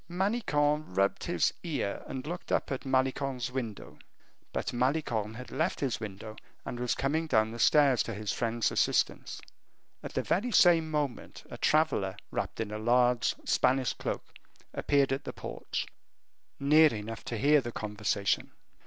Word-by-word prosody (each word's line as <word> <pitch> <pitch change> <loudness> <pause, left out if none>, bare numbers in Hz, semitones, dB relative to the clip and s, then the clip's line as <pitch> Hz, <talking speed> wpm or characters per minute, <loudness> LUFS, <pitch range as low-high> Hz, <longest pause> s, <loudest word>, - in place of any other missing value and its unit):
Manicamp 155 - 0
rubbed 100 0 +1
his 175 - +1
ear, 150 - -2
and 130 0 -5
looked 175 +3 -6
up - - 0
at 135 +1 -4
Malicorne's 130 -1 0
window; 120 -5 -6 0.5
but - - -3
Malicorne 120 -4 0
had 125 -1 -9
left 165 +4 -1
his 135 -4 -1
window 110 0 -7 0.3
and 120 - -5
was 125 -1 0
coming 155 +4 0
down 110 -5 +2
the 115 - -8
stairs 140 -3 +5
to - - -3
his 105 -1 -3
friend's 115 -1 0
assistance. - - 0 0.6
At - - -8
the - - 0
very 230 +7 0
same 170 -6 +5
moment, 145 -5 -3
a - - -6
traveler, 145 -12 +2
wrapped - - -3
in 110 -2 -3
a 105 - -4
large 120 +1 +3
Spanish 130 0 +2
cloak, - - -4 0.5
appeared 140 -2 +2
at 135 - -3
the - - -6
porch, - - -5 0.7
near 150 +2 +6
enough 110 +1 -6
to 115 - -3
hear 145 +5 +4
the 120 -1 -5
conversation. 105 -2 -1
130 Hz, 155 wpm, -30 LUFS, 110-150 Hz, 0.7 s, near